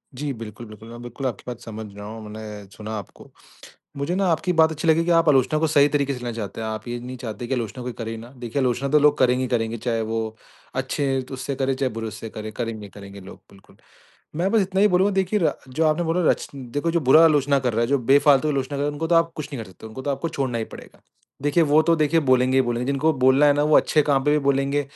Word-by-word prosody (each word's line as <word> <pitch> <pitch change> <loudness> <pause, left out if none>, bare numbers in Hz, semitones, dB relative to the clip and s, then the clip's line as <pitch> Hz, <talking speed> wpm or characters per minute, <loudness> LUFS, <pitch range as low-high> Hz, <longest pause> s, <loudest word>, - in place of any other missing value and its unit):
जी, 145 +2 -3
बिल्कुल, 115 -1 -9
बिल्कुल। 110 +1 -12
मैं 120 0 -10
बिल्कुल 120 +3 -5
आपकी 120 -5 -5
बात 120 -2 -6
समझ 110 -1 -7
रहा 105 0 -8
हूँ। 110 +1 -8
मैंने 105 -1 -8
सुना 110 0 -7
आपको। 100 - -11 0.7
मुझे 140 +5 -2
ना 195 0 +1
आपकी 180 +3 0
बात 160 0 +5
अच्छी 160 +2 -3
लगी 160 +1 +4
कि, 175 - -1
आप 165 -1 +4
आलोचना 145 +2 +3
को 160 - +2
सही 145 -2 +4
तरीके 140 -2 0
से - - -7
लेना 120 -1 -4
चाहते 105 -2 -5
हैं। 110 - -3
आप 110 +1 -5
ये 120 0 -3
नहीं 125 +1 -7
चाहते 120 +1 -5
कि 130 - -1
आलोचना 125 +1 -4
कोई 125 0 -4
करे 115 -1 -4
ना। 115 +1 -10
देखिए 125 +2 -3
आलोचना 125 +2 0
तो 150 +2 +4
लोग 150 0 +4
करेंगे 125 0 +3
ही 130 - -2
करेंगे, 115 -2 -1
चाहे 115 0 -1
वो 110 0 -3 0.4
अच्छे 135 +1 -1
उससे 135 +1 -4
करे, 135 0 0
चाहे 130 -1 -1
बुरे 115 0 -4
उससे 110 +1 -8
करे। 110 0 -7
करेंगे-करेंगे 100 -3 -7
लोग, 95 0 -12
बिल्कुल। 100 -1 -20 0.6
मैं 180 +4 0
बस 225 - +4
इतना 190 0 -1
ही 210 - +6
बोलूँगा 190 +2 +2
देखिए 190 +2 +1
रा 165 - +2
जो 145 +6 -1
आपने 155 +2 +1
बोला 165 +2 0
रच - - -2
देखो 140 +5 -3
जो 170 0 +1
बुरा 155 +5 +8
आलोचना 145 -3 +3
कर 125 -2 -1
रहा 110 - 0
है, 115 - +2
जो 140 +1 +2
बेफालतू 140 +3 +4
आलोचना 140 -1 -2
कर - - -3
रहे 145 - 0
है 145 - -1
उनको 155 +3 -3
तो 170 - +3
आप 165 0 +3
कुछ 150 -2 -5
नहीं 125 -5 -4
कर 95 - -14
सकते। 95 - -13
उनको 110 +4 -8
तो 145 - -2
आपको 140 +4 -2
छोड़ना 135 -6 -2
ही 110 - -2
पड़ेगा। - - -13 0.4
देखिए 145 +4 +3
वो 150 +1 +4
तो 165 +1 +3
देखिए 155 +1 +2
बोलेंगे 130 0 +3
ही 130 - +5
बोलेंगे। 120 0 -2
जिनको 140 +3 +1
बोलना 130 +3 +5
है 145 - +6
ना 145 - +1
वो 150 0 +5
अच्छे 155 - +3
काम 140 -2 +1
पे 150 - +3
भी 150 - +3
बोलेंगे, 140 +1 +1
130 Hz, 265 wpm, -23 LUFS, 115-150 Hz, 0.7 s, बुरा